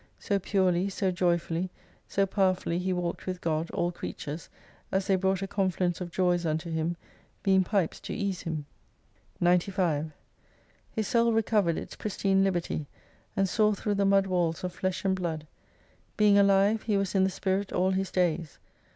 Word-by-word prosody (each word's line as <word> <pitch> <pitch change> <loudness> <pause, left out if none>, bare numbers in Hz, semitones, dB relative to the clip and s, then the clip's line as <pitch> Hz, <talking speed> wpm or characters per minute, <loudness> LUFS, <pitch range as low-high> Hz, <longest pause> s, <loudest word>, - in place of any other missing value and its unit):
So 200 -2 0
purely, 185 -1 +1
so 190 -1 0
joyfully, 175 0 0 0.4
so 195 - +1
powerfully 185 -3 +1
he 185 +1 -1
walked 175 -1 -3
with 185 -1 -3
God, 165 -1 -1
all 175 0 -1
creatures, 155 -2 -6 0.4
as 190 0 +1
they 195 - +3
brought 190 0 +1
a - - -2
confluence 185 -2 0
of 175 - -4
joys 175 0 +1
unto 160 +1 -2
him, 160 +2 -1 0.5
being 190 -1 +4
pipes 190 -3 0
to - - -6
ease 200 -4 -2
him. 155 -3 -4 0.7
*33 - - -28
95 175 -3 +2 0.8
His 215 -2 -2
soul 235 -1 +3
recovered 210 -6 +2
its - - -6
pristine 195 -2 +1
liberty, 175 -5 -1 0.5
and 195 - +3
saw 210 +2 +3
through 205 +1 -1
the 200 0 +1
mud 195 0 +4
walls 175 -3 0
of 180 -1 -3
flesh 185 +1 -2
and 190 -1 +3
blood. 165 -4 -3 0.7
Being 210 -1 +5
alive, 200 +2 +4
he 210 -3 0
was 195 -2 -1
in 190 -1 +3
the 190 - +3
spirit 190 +1 -1
all 185 +1 +2
his 190 0 -1
days. 170 -4 0
185 Hz, 170 wpm, -28 LUFS, 175-195 Hz, 0.8 s, Being